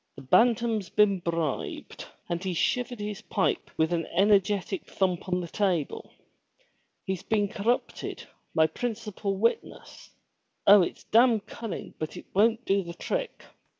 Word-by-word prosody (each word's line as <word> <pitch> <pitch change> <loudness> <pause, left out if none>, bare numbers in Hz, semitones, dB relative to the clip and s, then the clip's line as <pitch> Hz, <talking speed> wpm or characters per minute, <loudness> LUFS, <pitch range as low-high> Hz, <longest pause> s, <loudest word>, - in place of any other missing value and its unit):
The 135 - -11
Bantam's 225 - +3
been 210 -3 +3
bribed 165 -4 -3
!" - - -40
and 170 +1 -3
he 185 -2 -2
shivered 245 +6 0
his 210 0 -5
pipe 200 -3 -1
with 160 +2 +2
an 165 -1 -1
energetic 195 0 +2
thump 185 -1 -1
on 180 0 0
the 175 - -5
table. 180 -5 -1 1.0
"He's 190 -2 -2
been 210 -2 +1
corrupted, 220 +5 -2 0.3
my 160 -1 +5
principal 210 0 -3
witness. 230 +4 -2 0.6
Oh 200 0 +9
it's 175 - -3
damn 235 0 +4
cun 225 +2 -8
ning - - -6
but 155 - -5
it - - -9
won't 225 +4 +3
do 195 0 +2
the 170 -2 -8
trick. - - -3
200 Hz, 150 wpm, -27 LUFS, 175-220 Hz, 1.0 s, Oh